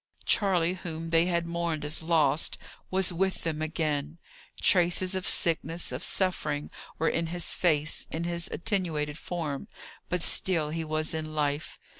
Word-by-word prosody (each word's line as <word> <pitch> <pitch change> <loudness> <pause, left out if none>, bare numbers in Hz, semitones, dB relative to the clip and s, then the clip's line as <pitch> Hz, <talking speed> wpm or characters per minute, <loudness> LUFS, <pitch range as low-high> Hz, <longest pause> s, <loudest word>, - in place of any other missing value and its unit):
Charley, 180 -4 +3
whom 165 -3 -6
they 165 +1 +4
had 170 -1 0
mourned 170 -3 -2
as 150 +3 +1
lost, 160 -2 +2 0.3
was 190 -1 +3
with 190 +2 -1
them 155 -2 -2
again: 155 -1 -2 0.4
traces 180 +1 +3
of 185 -1 -2
sickness, 165 0 +2
of - - -5
suffering 155 -6 0 0.3
were 160 - 0
in 165 0 0
his 175 +1 0
face, 155 -3 0
in 160 +1 -3
his 170 0 -2
attenuated 160 -6 -1
form; 155 -6 -4 0.4
but 180 -1 -1
still 160 -5 +2
he 165 +1 -2
was 155 0 -1
in 155 -1 -4
life. 145 0 -1
165 Hz, 150 wpm, -28 LUFS, 155-175 Hz, 0.4 s, they